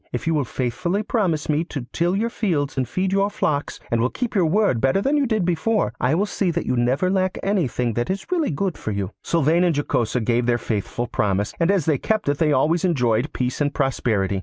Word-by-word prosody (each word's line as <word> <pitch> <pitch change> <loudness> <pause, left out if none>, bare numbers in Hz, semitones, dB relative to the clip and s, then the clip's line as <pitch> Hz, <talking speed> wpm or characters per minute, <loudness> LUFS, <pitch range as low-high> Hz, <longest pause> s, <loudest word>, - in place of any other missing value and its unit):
If 125 - -4
you 165 - +1
will 145 -3 +1
faithfully 170 - -2
promise 185 -9 0
me 150 +1 +1
to 140 -7 -6
till 175 +2 +1
your 230 +4 0
fields 155 -12 -1
and 130 -3 -1
feed 185 0 -1
your 195 +1 +2
flocks, 150 -7 -2
and 115 -1 +2
will 125 - +2
keep 245 - -4
your 185 -5 +3
word 190 - +2
better 135 +8 +3
than 275 +8 +1
you 285 -2 +2
did 215 -6 0
before, 180 - 0
I 130 +5 +2
will 195 +5 +2
see 200 -2 -1
that 170 0 -2
you 125 - 0
never 125 +8 +1
lack 185 -1 0
anything 140 - 0
that 120 +2 -2
is 190 +1 -2
really 340 -4 +1 0.2
for - - -6
your 100 -2 -2
good.' - - -27
Sylvain 165 +1 +2
and 175 -3 +2
Jocosa 125 -4 0
gave 120 +1 0
their 120 -1 +3
faithful 115 +1 -3
promise, 100 -2 -1
and 170 +1 +2
as 195 -6 +2
they 150 -5 +2
kept 215 -1 -1
it 145 - 0
they 155 -2 +3
always 155 +5 +2
enjoyed 125 -7 +1
peace 125 +2 -2
and 145 -1 0
prosperity. 105 -7 0
155 Hz, 235 wpm, -22 LUFS, 125-190 Hz, 0.2 s, your